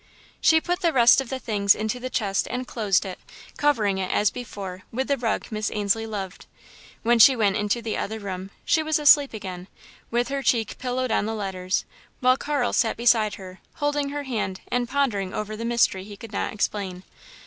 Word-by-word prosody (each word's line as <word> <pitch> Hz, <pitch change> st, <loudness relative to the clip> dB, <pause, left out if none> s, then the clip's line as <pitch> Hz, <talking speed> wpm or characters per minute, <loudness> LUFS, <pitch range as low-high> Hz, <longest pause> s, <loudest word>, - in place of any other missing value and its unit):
She 320 Hz, -, +5 dB
put 355 Hz, +2 st, -2 dB
the 335 Hz, -, +3 dB
rest 245 Hz, -1 st, +6 dB
of 265 Hz, -, -8 dB
the 265 Hz, -, -2 dB
things 205 Hz, -5 st, +2 dB
into 220 Hz, +3 st, -3 dB
the 255 Hz, +1 st, -5 dB
chest 200 Hz, -6 st, -1 dB
and 250 Hz, +1 st, -3 dB
closed 210 Hz, -6 st, 0 dB
it, 185 Hz, -1 st, -6 dB, 0.4 s
covering 220 Hz, -10 st, +1 dB
it, 185 Hz, -, -2 dB
as 205 Hz, -1 st, +2 dB
before, 195 Hz, -6 st, -7 dB
with 260 Hz, +3 st, -2 dB
the 280 Hz, -, +2 dB
rug 235 Hz, -4 st, -1 dB
Miss 215 Hz, -1 st, -2 dB
Ainslie 210 Hz, +2 st, 0 dB
loved. 195 Hz, -4 st, -6 dB, 0.6 s
When 235 Hz, +1 st, +3 dB
she 260 Hz, +4 st, +8 dB
went 205 Hz, -4 st, +2 dB
into 210 Hz, +3 st, -1 dB
the 220 Hz, -, -2 dB
other 220 Hz, +2 st, -3 dB
room, 190 Hz, -2 st, -6 dB, 0.2 s
she 320 Hz, -, +3 dB
was 315 Hz, -1 st, +1 dB
asleep 290 Hz, -1 st, +6 dB
again, 185 Hz, -4 st, -7 dB, 0.4 s
with 240 Hz, +1 st, 0 dB
her 275 Hz, 0 st, -2 dB
cheek 230 Hz, -5 st, 0 dB
pillowed 255 Hz, -1 st, -2 dB
on 210 Hz, -, +1 dB
the 225 Hz, -, -2 dB
letters, 185 Hz, -3 st, -2 dB, 0.3 s
while 255 Hz, 0 st, +4 dB
Carl 280 Hz, -2 st, -1 dB
sat 225 Hz, -, +1 dB
beside 225 Hz, -3 st, +3 dB
her, 185 Hz, -1 st, -11 dB, 0.2 s
holding 290 Hz, -1 st, -1 dB
her 290 Hz, 0 st, -4 dB
hand 220 Hz, -8 st, -3 dB
and 245 Hz, -1 st, -1 dB
pondering 215 Hz, -10 st, 0 dB
over 215 Hz, 0 st, -4 dB
the 230 Hz, +2 st, -5 dB
mystery 235 Hz, -5 st, +2 dB
he 205 Hz, 0 st, -10 dB
could 220 Hz, +1 st, -11 dB
not -, -, -2 dB
explain. 195 Hz, -3 st, -3 dB
225 Hz, 200 wpm, -24 LUFS, 200-255 Hz, 0.6 s, she